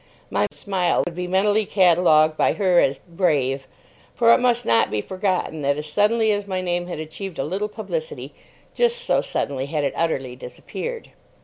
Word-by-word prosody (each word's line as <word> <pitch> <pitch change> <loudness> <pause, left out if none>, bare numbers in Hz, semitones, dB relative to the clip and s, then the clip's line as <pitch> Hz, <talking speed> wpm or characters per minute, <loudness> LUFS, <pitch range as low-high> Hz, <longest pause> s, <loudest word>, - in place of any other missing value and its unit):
My 105 +1 +1
smile 180 +4 0
would 175 - -5
be 180 +1 -4
mentally 205 +3 +2
catalogued 170 -4 +4
by - - +2
her 185 -4 +3
as 135 0 +2
"brave"; 145 -7 0 0.5
for 235 -1 +5
it - - +4
must 245 -1 +1
not 115 0 +3
be 105 - -1
forgotten 185 - -2
that 140 0 +1
as 150 - -4
suddenly 220 +1 +3
as 205 -1 -2
my 190 -1 -2
name 175 -1 -2
had 175 - -5
achieved 160 +3 -7
a - - -1
little 195 +7 -3
publicity, 465 - -5 0.4
just 480 0 +1
so - - +1
suddenly 135 -1 -3
had 150 0 -2
it 140 - -1
utterly 135 -7 -2
disappeared. 460 - -7
180 Hz, 180 wpm, -22 LUFS, 150-210 Hz, 0.5 s, for